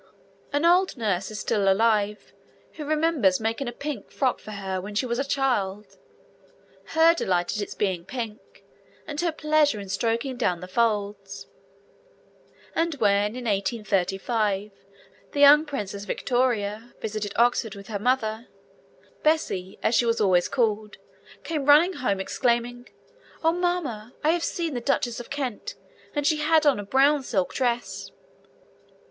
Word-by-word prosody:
An 290 +2 +1
old 360 -1 +4
nurse 200 -5 -1
is 215 -2 -6
still 195 -1 +2
alive 210 0 +1 0.4
who 305 - -7
remembers 300 - +2
making 225 +4 -2
a - - -2
pink 280 -2 -6
frock 260 -3 0
for - - -12
her 190 -3 -4
when 205 +2 -8
she 240 - +1
was 235 0 -2
a - - +1
child, 240 -8 -1 1.0
her 325 +1 +6
delight 180 - 0
at 210 - -2
its 205 - -5
being 185 -4 -1
pink 230 -1 -7 0.4
and 295 +1 -4
her 345 -1 +1
pleasure 305 -6 +2
in 200 -1 -8
stroking 230 +6 -1
down 180 -8 0
the 180 - -8
folds; 200 -2 -1 1.3
and 330 -1 0
when 205 -2 +2
in 250 -1 -6
1835 205 0 -1 0.6
the 285 - -2
young 290 +2 +8
Princess 205 -7 -5
Victoria 235 -2 -1
visited 215 -1 -4
Oxford 235 -3 +2
with 200 0 -10
her 205 0 -4
mother, 230 -1 0 0.7
Bessie, 195 - 0
as 220 - +2
she 240 - +3
was 230 0 +1
always 185 -4 +3
called, 215 -4 -1 0.5
came 300 -4 -3
running 310 +6 +6
home, 200 - -1
exclaiming, 245 +3 -1 0.5
'Oh, 325 - +4
mamma, 330 -11 -2
I 310 - +4
have 340 0 0
seen 335 -3 -2
the 245 - -3
Duchess 235 0 0
of 240 - -9
Kent, 270 -6 -4 0.4
and 290 -1 -1
she 310 +1 +3
had 310 +1 +3
on 280 -7 +4
a - - -4
brown 275 +7 +3
silk 200 -8 -1
dress.' 245 -2 -2
235 Hz, 150 wpm, -25 LUFS, 205-285 Hz, 1.3 s, young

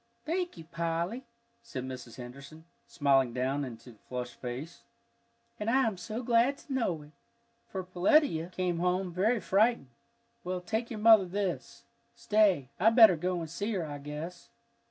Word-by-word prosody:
"Thank 350 - -2
you, 165 - -9
Polly," 170 +9 -3 0.4
said 150 - -6
Mrs. 125 -3 -8
Henderson, 140 +6 -11 0.2
smiling 140 - +2
down 130 +3 -1
into 120 -1 -8
the 110 - -20
flushed 125 -1 -4
face. 130 +7 -6 0.8
"And 210 +1 -1
I 265 +2 +4
am 220 -3 0
so 215 +6 -5
glad 240 +4 +3
to 275 - -8
know 185 - -1
it, 150 - -16 0.6
for 190 -1 -5
Peletiah 180 - +2
came 180 -2 -1
home 180 0 0
very 215 +7 +2
frightened. 210 - +2 0.5
Well, 180 0 -2
take 220 +6 -3
your 225 - -5
mother 215 -2 +7
this. 190 0 -4 0.3
Stay, 210 - +2
I 210 +5 +6
better 225 -5 +8
go 180 +2 -2
and 165 - -5
see 205 +6 -2
her, 180 -5 -1
I 145 -1 -6
guess." 155 +7 -7
180 Hz, 160 wpm, -30 LUFS, 145-225 Hz, 0.8 s, better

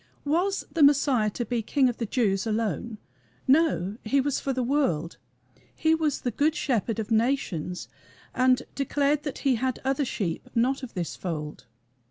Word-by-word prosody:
Was 360 +7 0
the 330 - 0
Messiah 280 -6 +4
to 240 +4 -4
be 240 +2 -2
the - - 0
King 265 +4 +2
of 245 - -2
the 230 - -3
Jews 200 -3 +1
alone? 220 +1 -2 0.5
No; 260 - +3
he 270 +6 +2
was 280 0 0
for 275 - -2
the 255 -1 -1
world; 235 - 0 0.6
he 320 0 +2
was 315 -3 0
the 245 - -1
Good 305 +5 +1
Shepherd 230 - 0
of 220 0 -4
nations, 220 - 0 0.5
and 255 0 +3
declared 285 +1 +1
that 290 -2 -5
he 260 -3 +3
had 255 +1 -1
"other 270 +2 +1
sheep, 195 -10 -3
not 255 +4 +2
of 255 - -8
this 175 -3 -3
fold." 155 -7 -5
255 Hz, 175 wpm, -26 LUFS, 215-280 Hz, 0.6 s, Messiah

